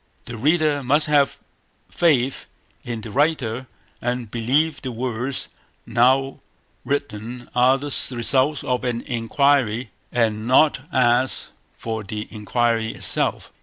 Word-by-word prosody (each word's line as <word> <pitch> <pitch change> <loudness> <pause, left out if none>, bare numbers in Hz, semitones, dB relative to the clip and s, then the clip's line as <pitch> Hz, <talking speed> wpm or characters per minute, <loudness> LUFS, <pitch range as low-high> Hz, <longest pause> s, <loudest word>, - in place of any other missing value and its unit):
The 120 - -7
reader 150 +3 +2
must 145 +4 +2
have 145 -2 +2 0.5
faith 135 -6 +1 0.4
in 115 -2 -5
the 110 - -8
writer, 130 -3 0 0.3
and 120 -2 -3
believe 140 +7 +1
the 130 - -4
words 125 +2 -3 0.4
now 130 +3 +2 0.4
written 120 -3 -4
are 125 +2 +4
the 145 +1 -6 0.2
results 130 +4 +1
of 125 -1 -1
an 120 -1 -1
inquiry, 120 -1 +1 0.2
and 110 -2 0
not 135 +3 +4
ask 125 0 +1 0.2
for 110 -1 -4
the 105 +1 -5
inquiry 115 +1 0
itself. - - -1
125 Hz, 120 wpm, -22 LUFS, 115-140 Hz, 0.5 s, are